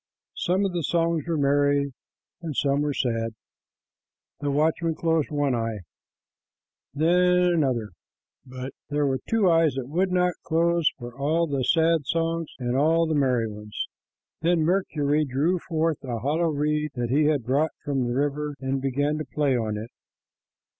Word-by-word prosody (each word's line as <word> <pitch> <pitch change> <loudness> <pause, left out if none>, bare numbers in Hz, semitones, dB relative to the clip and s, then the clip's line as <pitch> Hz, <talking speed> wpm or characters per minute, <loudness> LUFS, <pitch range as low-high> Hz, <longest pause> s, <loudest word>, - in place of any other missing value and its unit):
Some 190 +2 +1
of 195 - 0
the 175 - -1
songs 165 0 0
were 165 -2 0
merry, 140 0 +2 0.5
and 160 -4 -5
some 140 +1 +1
were 150 0 0
sad. 115 -4 -1 1.0
The 145 - -2
watchman 160 +3 +1
closed 160 -2 +1
one 145 -3 0
eye, 115 -3 -2 1.1
then 160 +4 +2
another 180 0 +4
and 175 - +3
another, 130 -9 0 0.5
but 130 +1 -7 0.2
there 145 0 +1
were 135 -1 0
two 225 -4 +3
eyes 165 -5 +4
that 130 -2 -4
would 180 +6 0
not 180 -1 +2
close 170 0 +2
for 120 -2 -9
all 155 +5 +1
the 140 -4 -1
sad 160 0 +2
songs 165 -1 -1
and 125 -1 -2
all 160 +4 +3
the 160 - -1
merry 130 -6 +2
ones. 105 0 -6 0.6
Then 170 0 +2
Mercury 155 -4 +1
drew 150 +7 0
forth 160 -2 -1
a 125 -3 -3
hollow 155 +8 0
reed 150 0 -1
that 120 -1 -2
he 150 +3 +3
had 150 -4 +2
brought 140 +6 +1
from 135 -4 0
the 120 - -2
river 145 +1 -1
and 135 0 -2
began 145 +3 0
to 155 - -4
play 145 -3 +2
on 110 -3 -1
it. 110 +3 -7
145 Hz, 165 wpm, -25 LUFS, 135-165 Hz, 1.1 s, another